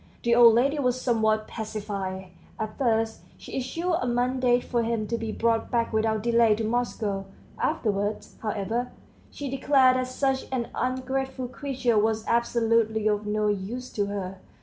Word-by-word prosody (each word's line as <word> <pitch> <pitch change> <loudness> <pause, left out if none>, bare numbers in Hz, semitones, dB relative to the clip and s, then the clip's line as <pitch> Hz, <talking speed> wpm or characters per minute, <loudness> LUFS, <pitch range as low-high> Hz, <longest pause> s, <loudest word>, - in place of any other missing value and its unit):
The 235 - +3
old 235 -1 +8
lady 275 +5 +2
was 250 -2 +1
somewhat 220 -3 +1
pacified; 200 -4 -5 0.3
at 215 -1 -4
first 225 -3 +1 0.2
she - - -9
issued 335 +8 -2
a 250 - -1
mandate 245 0 +2
for 240 -2 0
him 230 -1 -1
to 235 - -2
be 225 -1 -3
brought 230 0 0
back 230 -1 0
without 220 -1 +1
delay 230 -2 +4
to 225 - -3
Moscow; 215 -4 -1 0.3
afterwards, 205 -1 -1
however, 225 +3 -2 0.4
she 285 - -6
declared 265 -1 +4
that 255 0 -1
such 265 +1 -1
an 245 -3 -2
ungrateful 260 0 -2
creature 255 -4 0
was 220 +1 0
absolutely 230 -2 +2
of 210 0 0
no 210 0 +1
use 210 +5 -3
to 205 -1 -1
her. 190 -2 -5
230 Hz, 155 wpm, -26 LUFS, 215-250 Hz, 0.4 s, old